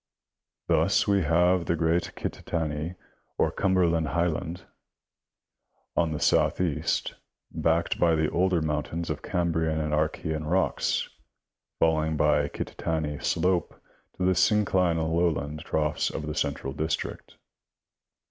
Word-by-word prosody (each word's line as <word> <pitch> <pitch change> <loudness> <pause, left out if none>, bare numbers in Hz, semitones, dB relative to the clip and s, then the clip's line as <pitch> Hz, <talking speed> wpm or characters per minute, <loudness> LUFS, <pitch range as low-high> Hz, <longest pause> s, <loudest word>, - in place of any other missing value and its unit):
Thus - - +3
we 100 -1 +3
have 90 +2 +2
the 85 - +2
great 85 +1 0
Kittatinny 80 +1 -3 0.4
or - - +2
Cumberland 85 -4 +2
highland, 85 +2 -1
C, - - -19
C, - - -25 1.3
on 85 -2 +2
the 75 - -3
south - - +2
east, 85 -5 0 0.4
backed 80 +1 0
by 85 -2 +4
the 80 0 +1
older 90 -2 +2
mountains 80 +2 -2
of 75 -1 -4
Cambrian 80 -3 0
and 75 -1 -2
Archean 75 0 -1
rocks, 95 +2 +1 0.7
falling 80 -1 +2
by 75 0 +3
the 70 - -3
Kittatinny 80 -3 -3
slope 90 0 0 0.4
to 90 - 0
the 95 - +4
synclinal 90 -4 +2
lowland 75 -3 0
troughs 75 -1 0
of 75 - -5
the 75 - -3
central 65 -2 -2
district. 80 +2 -4
80 Hz, 130 wpm, -27 LUFS, 75-85 Hz, 1.3 s, by